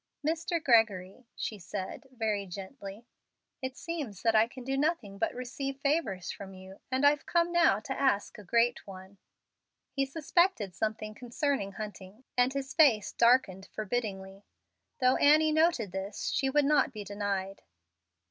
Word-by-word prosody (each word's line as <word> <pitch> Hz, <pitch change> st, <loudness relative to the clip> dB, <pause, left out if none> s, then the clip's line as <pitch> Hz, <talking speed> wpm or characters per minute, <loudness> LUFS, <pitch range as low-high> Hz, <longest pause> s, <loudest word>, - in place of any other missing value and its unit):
"Mr. 335 Hz, +2 st, 0 dB
Gregory," 225 Hz, -2 st, +2 dB
she 215 Hz, -, -4 dB
said, 185 Hz, +7 st, -6 dB
very 220 Hz, -5 st, -2 dB
gently, 195 Hz, +3 st, -9 dB, 0.6 s
"it 260 Hz, 0 st, -5 dB
seems 295 Hz, -, -5 dB
that 225 Hz, -1 st, +3 dB
I 220 Hz, +1 st, +5 dB
can 255 Hz, +1 st, -10 dB
do 270 Hz, +2 st, -2 dB
nothing 270 Hz, -9 st, -1 dB
but -, -, +1 dB
receive 265 Hz, +2 st, -4 dB
favors 275 Hz, -, -1 dB
from 195 Hz, -1 st, -9 dB
you, 190 Hz, +1 st, -12 dB
and 260 Hz, +2 st, +2 dB
I've 290 Hz, 0 st, +3 dB
come 345 Hz, 0 st, +2 dB
now 340 Hz, -, +4 dB
to 265 Hz, -, -4 dB
ask 255 Hz, -7 st, +1 dB
a -, -, -10 dB
great 235 Hz, +4 st, +1 dB
one." 190 Hz, 0 st, -11 dB, 0.7 s
He 275 Hz, -1 st, -1 dB
suspected 320 Hz, -, +1 dB
something 215 Hz, 0 st, -3 dB
concerning 245 Hz, -2 st, -2 dB
Hunting, 210 Hz, +2 st, -8 dB
and 250 Hz, +1 st, +3 dB
his 275 Hz, 0 st, -4 dB
face 245 Hz, -, +4 dB
darkened 235 Hz, -6 st, +3 dB
forbiddingly. 200 Hz, -3 st, -4 dB, 0.6 s
Though 255 Hz, -1 st, +4 dB
Annie 310 Hz, +2 st, +5 dB
noted 315 Hz, -, +2 dB
this, 195 Hz, +2 st, -4 dB
she 270 Hz, -, 0 dB
would 290 Hz, +1 st, +3 dB
not 295 Hz, -1 st, +3 dB
be 215 Hz, -4 st, -7 dB
denied. 200 Hz, -1 st, -3 dB
235 Hz, 150 wpm, -30 LUFS, 200-275 Hz, 0.7 s, I